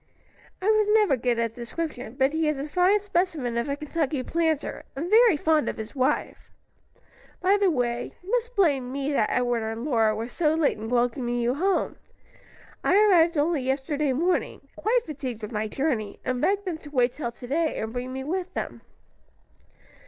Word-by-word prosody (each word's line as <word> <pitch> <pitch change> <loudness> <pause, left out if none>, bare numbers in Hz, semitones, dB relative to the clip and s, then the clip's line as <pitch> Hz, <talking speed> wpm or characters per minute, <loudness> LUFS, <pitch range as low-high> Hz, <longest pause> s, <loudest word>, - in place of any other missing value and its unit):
"I 370 - -6
was 430 0 +4
never 420 -10 +4
good 245 -1 0
at 230 -1 -1
description, 245 0 -5
but 270 +2 +2
he 320 0 +1
is 300 -2 0
a 280 +2 -4
fine 360 +6 +3
specimen 345 - -1
of 235 +4 -1
a 280 - 0
Kentucky 300 -2 -2
planter, 320 0 -1
and 330 +7 -4
very 450 -6 +6
fond 310 0 +2
of - - -5
his 220 +4 -7
wife. 265 +2 -1 0.9
By 380 +2 +3
the 400 -2 +3
way, 245 -5 -1
you 380 - -8
must - - 0
blame 280 -10 +2
me 275 +2 -2
that 215 -6 +2
Edward 245 -2 +1
and 225 +2 -4
Lora 225 -6 +2
were 225 +2 -4
so 305 +4 +1
late 315 -8 +1
in 220 +1 -5
welcoming 245 0 0
you 240 +1 +1
home. 375 +7 0 0.9
I - - +3
arrived 355 -6 +5
only 300 0 +1
yesterday 275 +2 -1
morning, 340 +8 -1
quite 475 +3 +1
fatigued 260 -7 -6
with 210 - -5
my 215 -1 -2
journey, 235 -4 -2
and 255 -1 -1
begged 405 +1 +1
them 340 -4 -3
to 295 - -11
wait 250 -4 +2
till 240 -6 -4
to 245 - -11
day, 315 +5 0
and 220 +1 -4
bring 250 +1 -4
me 265 0 -4
with 365 +5 -3
them." - - -4
285 Hz, 190 wpm, -26 LUFS, 245-340 Hz, 0.9 s, very